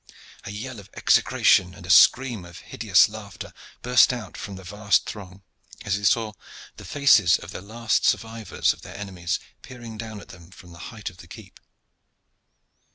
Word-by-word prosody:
A - - -6
yell 115 +3 -7
of 100 0 -14
execration 90 -1 +3
and 90 - -12
a 90 - -1
scream 120 +4 +5
of 85 -1 -12
hideous - - +4
laughter 105 -3 -10 0.3
burst 125 +1 +5 0.3
from 100 - -7
the 95 - -11
vast 105 +2 0
throng, 95 -2 -9 0.4
as 100 - 0
they 100 - -6
saw 110 0 +2 0.4
the - - -11
faces 115 -11 +4
of 85 - -11
the - - -7
last 110 +3 -1
survivors 115 -1 0
of - - -18
their - - -11
enemies 90 -4 -4 0.2
peering 120 -4 -11
down 110 -2 -7
at - - -15
them 85 -1 -14
from 90 -2 -15
the 85 - -14
height 110 -4 -7
of 90 - -21
the - - -14
keep. - - -13
105 Hz, 170 wpm, -24 LUFS, 90-115 Hz, 0.4 s, scream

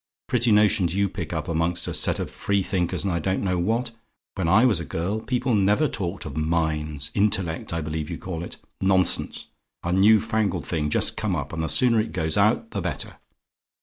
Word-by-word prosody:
Pretty 120 -1 +2
notions 105 -4 +3
you 100 0 +2
pick 90 -4 -6
up 80 -3 -3
among 85 +1 0
a 85 - -1
set - - +2
of - - -4
free 100 -1 0
thinkers, 90 -2 -1
and 95 -2 -1
I 85 - 0
don't 95 +5 -1
know 90 -2 0
what! 115 +7 0 0.4
When 95 -4 -2
I 105 +8 +5
was 110 -9 +3
a - - -4
girl, 85 +8 -2
people 125 +2 -1
never 105 +8 +3
talked 95 -7 -4
of 75 -3 -7
minds 75 -2 -1
intellect, 95 -5 0
I 85 0 -2
believe 75 0 -4
you - - -4
call 85 -3 -5
it. - - -8 0.2
Nonsense! 95 -2 +1 0.4
a 85 - -2
new 105 +4 +6
fangled 105 -7 -1
thing, 75 -1 -1
just - - +1
come - - -1
up; - - -4
and 80 - -2
the 80 - -1
sooner 120 -3 +3
it 110 - -2
goes 80 -3 -1
out, 110 +2 +2
the 100 - -3
better. 85 -6 -5
95 Hz, 210 wpm, -24 LUFS, 80-105 Hz, 0.4 s, new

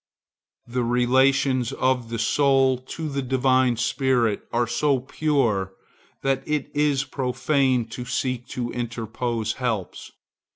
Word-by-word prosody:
The 125 +1 -2
relations 130 +1 +2
of 130 -3 0
the 115 - -3
soul 135 +2 +3
to 155 +5 -6
the 140 -2 -2
divine 130 -1 +2
spirit 120 -2 +1
are 120 +1 +1
so 130 +4 +1
pure 125 -9 0 0.5
that 135 -1 +1
it 150 -1 -2
is 145 -2 +2
profane 130 -2 0
to 125 +2 -6
seek 125 -1 -2
to 120 -1 -4
interpose 115 -1 -3
helps. 115 -8 -4
125 Hz, 120 wpm, -24 LUFS, 120-135 Hz, 0.5 s, soul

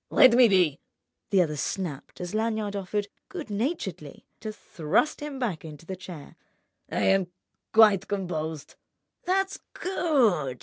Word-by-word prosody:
"Let 255 - +7
me 245 0 +7
be," 180 -8 +3 0.5
the 190 -3 +5
other 150 -3 -3
snapped 150 0 -4
as 175 +1 -5
Lanyard 215 -2 -1
offered 200 +1 -2 0.2
good 330 - -7
naturedly 245 +12 -3
to 215 - -5
thrust 170 - 0
him 295 -2 -5
back 225 -11 -2
into 155 0 -10
the 190 - -5
chair. 175 -5 -10 0.5
"I - - 0
am—quite 195 +2 +2
composed." 160 -6 -3 0.5
"That's 385 +1 0
good! 230 - +1
195 Hz, 130 wpm, -27 LUFS, 170-230 Hz, 0.5 s, Let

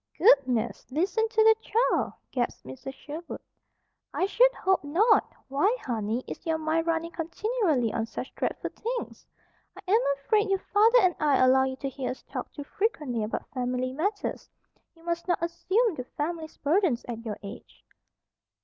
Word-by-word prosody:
"Goodness! 255 - +3
Listen 390 - 0
to 440 0 +3
the 445 0 +7
child!" 460 +2 +1 0.2
gasped 245 -2 -2
Mrs. 130 - -8
Sherwood. 310 +5 -8 0.7
"I - - 0
should - - +5
hope 380 -3 +1
not! 375 +11 +3 0.2
Why, 300 - +2
honey, 225 0 -2
is - - -8
your 325 -1 0
mind 315 +1 0
running 330 0 0
continually 335 - 0
on 225 0 -1
such 255 - -7
dreadful - - -3
things? 480 +1 -5 0.5
I - - -9
am 445 +3 +5 0.2
afraid 420 +9 +1
your 390 - +3
father 435 +5 +4
and 365 -1 +4
I 290 -3 +3
allow 260 +1 +5
you 260 0 -3
to 275 - -5
hear 265 0 -4
us 255 - -6
talk - - -6
too 290 - -7
frequently 295 - -1
about 210 - -4
family 255 0 -2
matters. 400 +9 -3 0.5
You 330 - -21
must 340 +1 -3
not 355 - +2
assume 375 +7 +1
the 255 - -5
family's 315 +4 -5
burdens 305 - +1
at 230 -2 -5
your 215 -3 -4
age." 200 - -11
320 Hz, 165 wpm, -27 LUFS, 255-395 Hz, 0.7 s, the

